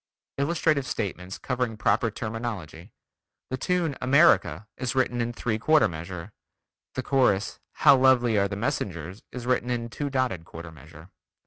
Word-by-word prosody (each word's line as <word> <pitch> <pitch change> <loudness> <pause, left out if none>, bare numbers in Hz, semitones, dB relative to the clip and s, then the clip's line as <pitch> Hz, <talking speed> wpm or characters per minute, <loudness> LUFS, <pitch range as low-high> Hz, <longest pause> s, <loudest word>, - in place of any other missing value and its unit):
Illustrative 150 -2 +1
statements 95 -3 -4
covering 125 -4 -2
proper 115 +1 +2
terminology: 110 -6 -6 0.6
the - - 0
tune 170 -1 0
"America" 140 -4 +4
is 130 0 -3
written 125 -2 +1
in 120 0 -1
three 115 -2 -2
quarter 155 0 +4
measure. 85 +2 -7 0.6
The 130 - -2
chorus: 125 -8 +1
"How - - +6
lovely 125 -3 +4
are 100 -1 +3
the 100 - -5
Messengers" 95 -3 -3
is 125 -1 -7
written 125 -1 0
in 120 -1 -2
two 145 +5 -4
dotted 130 - -1
quarter 80 0 -10
measure. 80 +3 -15
115 Hz, 145 wpm, -26 LUFS, 95-130 Hz, 0.6 s, How